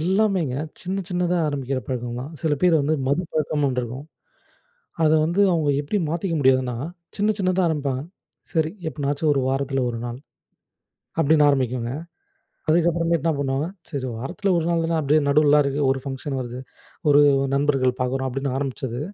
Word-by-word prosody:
எல்லாமேங்க, 190 -6 +1 0.3
சின்ன 190 +2 -2
சின்னதா 180 -1 0
ஆரம்பிக்கிற 135 -2 -2
பழக்கம் 120 -2 -3
தான். 135 +4 -6
சில 160 -2 +1
பேர் 180 -2 +5
வந்து 145 +3 +1
மது 140 +6 +1
பழக்கம்ன்னு 150 -1 0
ஒன்று 125 -1 -1
இருக்கும். 125 +5 -7 1.0
அதை 155 0 +5
வந்து 170 +5 0
அவங்க 155 -4 +2
எப்படி 145 +8 -1
மாத்திக்க 170 +2 -1
முடியாதுன்னா, 130 -2 +3 0.4
சின்ன 210 +1 +2
சின்னதா 185 -1 +1
ஆரம்பிப்பாங்க. 140 -5 -1 0.5
சரி 160 -2 +1 0.2
எப்பனாச்சும் 145 0 -1
ஒரு 140 - +1
வாரத்தில 135 0 0
ஒரு 115 - -5
நாள் 120 0 -5 1.0
அப்படின்னு 150 -1 +5
ஆரம்பிக்குங்க. 125 -3 0 0.8
அதுக்கப்புறமேட்டு 170 -1 +2
என்ன 165 - +3
பண்ணுவாங்க, 140 +1 -1 0.2
சரி 140 -5 -3
வாரத்தில 190 - -1
ஒரு 165 - -1
நாள் 165 -1 +1
தானே, 165 0 0
அப்படியே 150 +1 +3
நடுவுலலாம் 150 0 +5
இருக்கு 140 +1 -1
ஒரு 135 0 0
ஃபங்ஷன் 135 0 -4
வருது, 125 0 -6 0.5
ஒரு 145 0 +7 0.3
நண்பர்கள் 135 -3 +1
பார்க்குறோம் 130 +1 -1
அப்படின்னு 135 +1 -2
ஆரம்பிச்சது. 130 -3 -3
145 Hz, 155 wpm, -23 LUFS, 130-165 Hz, 1.0 s, ஒரு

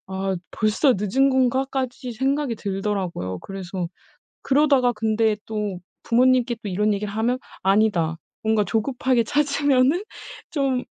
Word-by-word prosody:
'아 190 0 -2
벌써 220 +5 +2
늦은 265 +7 +2
건가?' 260 0 +2
까지 255 -1 -3
생각이 270 +2 0
들더라고요. 195 - -3
그래서 185 -2 -5 0.5
그러다가 275 -3 +3
근데 220 0 +1
또 210 -4 -3 0.3
부모님께 245 0 +3
또 205 - -4
이런 210 +3 +1
얘기를 200 0 -4
하면 230 +4 0 0.2
"아니다, 190 -5 +2 0.3
뭔가 220 -1 +2
조급하게 240 +3 +1
찾으면은 285 - +2 0.5
좀 275 -5 0
225 Hz, 290 characters per minute, -23 LUFS, 200-260 Hz, 0.5 s, 그러다가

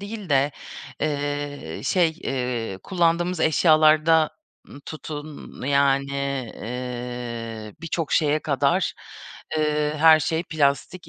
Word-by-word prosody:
değil 205 -1 -7
de, 140 0 +2 0.5
eee, 145 - -3
şey, 175 +4 +3
eee, 125 -6 -3
kullandığımız 175 -1 +1
eşyalarda, 155 0 +4 0.4
ııı, 140 - -12
tutun, 155 -1 -8
yani, 140 -1 +2 0.4
eee, 120 -2 -6
birçok 165 -1 -3
şeye 150 -1 +3
kadar, 140 -4 0 0.6
eee, 150 0 0
her 160 0 +7
şey 160 +4 -1
plastik 155 +2 -1
150 Hz, 95 wpm, -24 LUFS, 135-160 Hz, 0.6 s, her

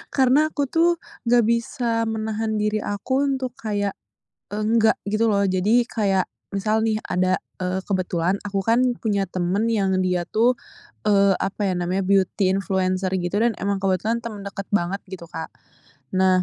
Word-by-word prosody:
Karena 270 +3 +4
aku 290 -2 -2
tuh 340 +1 +4 0.3
nggak 240 0 +5
bisa 230 0 0
menahan 220 0 -2
diri 210 0 0
aku 260 +8 -1
untuk 260 -1 -3
kayak, 205 -4 -2 0.5
enggak 220 +2 +2
gitu 215 +3 +1
loh. 200 -2 +2
Jadi 200 +5 +3
kayak 200 -5 +1 0.3
misal 215 +2 +1
nih 220 -1 +1
ada 185 +1 +1 0.2
eee, 185 +1 -2
kebetulan 185 -1 0
aku 195 -1 -1
kan 230 +4 +3 0.2
punya 200 -4 -1
temen 185 +5 0
yang 205 -4 +1
dia 180 -1 +1
tuh, 230 +8 +2 0.5
eee, 200 -2 +4
apa 195 +2 -2
ya 185 - +1
namanya, 180 +2 -1
beauty 195 0 +2
influencer 185 0 0
gitu 180 +5 0
dan 235 - +3
emang 200 +1 0
kebetulan 205 +5 0
temen 220 -3 -6
deket 195 0 -7
banget 195 0 0
gitu, 170 -3 -8
Kak. 160 -1 -7 0.6
Nah, 185 -1 +3
205 Hz, 155 wpm, -23 LUFS, 190-225 Hz, 0.6 s, nggak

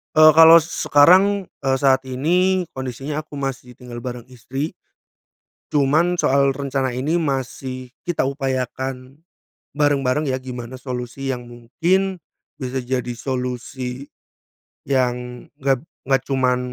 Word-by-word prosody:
Eee, 155 0 +9
kalau 165 +1 +9
sekarang, 185 +5 +4 0.2
eee, 135 0 +2
saat 135 -1 +3
ini 175 +8 +1
kondisinya 135 +4 -4
aku 150 -2 -9
masih 135 -2 -4
tinggal 120 -1 -9
bareng 125 -1 -6
istri 130 +4 -5 1.0
cuman 155 +5 +2
soal 140 +1 +3
rencana 135 -1 -2
ini 130 +6 -1
masih 130 -2 -4
kita 175 -6 -1
upayakan 130 0 -4 0.5
bareng-bareng 145 -1 +1
ya 130 - 0
gimana 125 -1 -7
solusi 125 +1 -5
yang 120 -1 -8
mungkin 175 +11 -1 0.4
bisa 130 +1 -3
jadi 125 0 -2
solusi, 125 +1 -4 0.8
yang 125 -2 -1
enggak 135 0 +1 0.2
enggak 135 -1 +2
cuman 130 -2 +1
135 Hz, 115 wpm, -21 LUFS, 125-145 Hz, 1.0 s, Eee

